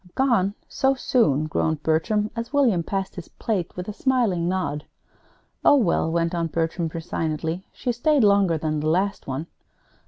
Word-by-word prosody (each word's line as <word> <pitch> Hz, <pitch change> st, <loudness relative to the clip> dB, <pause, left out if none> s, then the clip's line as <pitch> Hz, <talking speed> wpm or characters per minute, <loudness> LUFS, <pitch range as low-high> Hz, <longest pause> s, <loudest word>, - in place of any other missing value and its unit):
"Gone, 230 Hz, -7 st, +2 dB
so 270 Hz, -1 st, +1 dB
soon?" 155 Hz, -, +2 dB
groaned 155 Hz, 0 st, -1 dB
Bertram, 210 Hz, +7 st, +1 dB
as 230 Hz, 0 st, -4 dB
William 255 Hz, -11 st, +3 dB
passed 195 Hz, +3 st, -3 dB
his 180 Hz, -, -8 dB
plate, 195 Hz, -7 st, -3 dB
with 180 Hz, -, -5 dB
a 210 Hz, -, -4 dB
smiling 215 Hz, -10 st, +1 dB
nod. 180 Hz, -5 st, -2 dB, 0.8 s
"Oh, -, -, +7 dB
well," 180 Hz, -, +2 dB
went 170 Hz, +1 st, 0 dB
on 170 Hz, -1 st, 0 dB
Bertram, 165 Hz, +1 st, -1 dB
resignedly, 165 Hz, +1 st, -3 dB
"she 245 Hz, -, -2 dB
stayed 275 Hz, +3 st, +2 dB
longer 200 Hz, -5 st, +4 dB
than 155 Hz, 0 st, -2 dB
the 155 Hz, +1 st, 0 dB
last 190 Hz, +5 st, 0 dB
one. 135 Hz, +4 st, -3 dB
180 Hz, 160 wpm, -24 LUFS, 160-225 Hz, 0.8 s, Oh